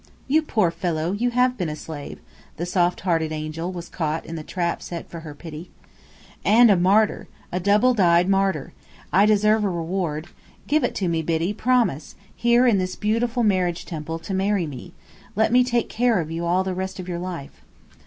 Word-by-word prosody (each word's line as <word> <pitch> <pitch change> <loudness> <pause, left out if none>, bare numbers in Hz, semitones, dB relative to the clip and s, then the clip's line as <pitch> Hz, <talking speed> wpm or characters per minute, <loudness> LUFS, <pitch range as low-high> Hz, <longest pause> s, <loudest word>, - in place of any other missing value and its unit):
"You 305 +4 +3
poor 215 - +1
fellow, 170 -2 -2
you 230 +5 0
have 250 0 +1
been 175 -4 -1
a 150 - -4
slave!" 150 -1 -8 0.4
The 170 - -3
soft 175 0 +1
hearted 165 -4 0
angel 155 +3 -4
was 175 -2 -7
caught 160 -2 -3
in 165 - -6
the 160 - -5
trap 170 +2 -2
set 170 -2 -7
for 170 - -8
her 155 -2 -9
pity. 160 +2 -9 0.7
"And 230 +1 +6
a - - +6
martyr. 195 +4 +2 0.2
A 180 - -1
double 210 +7 +3
dyed 175 -4 +4
martyr. 195 -6 0 0.4
I 200 +3 +5
deserve 215 +1 +3
a 200 - +1
reward. 170 -2 -2 0.4
Give 305 +2 +2
it - - -1
to 190 - -1
me, 165 -1 0
Biddy. 165 +4 -1
Promise, 225 - 0 0.2
here 240 +1 +3
in 225 -6 +4
this 185 0 -2
beautiful 230 +3 0
Marriage 185 -5 +1
Temple, 165 -1 -5
to 180 +4 -6
marry 195 -1 +1
me. 140 -5 -9 0.4
Let 220 +2 +2
me 250 +1 +5
take 240 -2 0
care 240 -3 +1
of 160 -1 -4
you 165 +1 -3
all 180 +2 +2
the 190 0 -3
rest 190 +1 -4
of 185 - -6
your 175 -1 -3
life." 175 -6 -7
185 Hz, 195 wpm, -23 LUFS, 165-215 Hz, 0.7 s, And